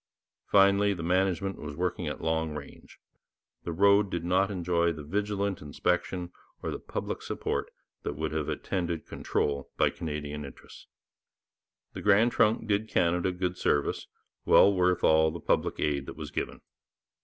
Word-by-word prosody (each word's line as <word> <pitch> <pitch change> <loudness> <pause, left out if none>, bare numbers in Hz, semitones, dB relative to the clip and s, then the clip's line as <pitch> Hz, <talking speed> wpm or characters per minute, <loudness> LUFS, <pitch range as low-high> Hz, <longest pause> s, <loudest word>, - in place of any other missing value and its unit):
Finally, 100 0 +4
the 85 - -6
management 95 +2 0
was 75 -1 -6
working 90 0 -2
at 75 - -4
long 80 -1 0
range: 70 -2 -10 0.7
the 85 - -2
road 100 +3 +4
did 85 -2 -3
not 95 +3 +2
enjoy 85 -3 +1
the 75 -2 -7
vigilant 100 +3 -2
inspection 90 +4 -1 0.3
or - - -2
the - - -4
public - - -5
support - - -3 0.3
that - - -4
would 80 +1 -3
have 75 -1 -2
attended 85 -4 -2
control 70 -1 -2
by - - +3
Canadian 75 -2 -5
interests. 70 -2 -12 1.1
The - - -6
Grand 105 +4 +4
Trunk 110 -1 +2
did 105 +1 0
Canada 90 +1 +2
good 90 0 -3
service, 75 - 0 0.4
well 100 - +6
worth 90 -1 +2
all 80 0 +5
the 85 +2 -6
public - - 0
aid 70 -2 0
that - - -8
was 75 -2 -7
given. - - -4
90 Hz, 155 wpm, -29 LUFS, 80-100 Hz, 1.1 s, well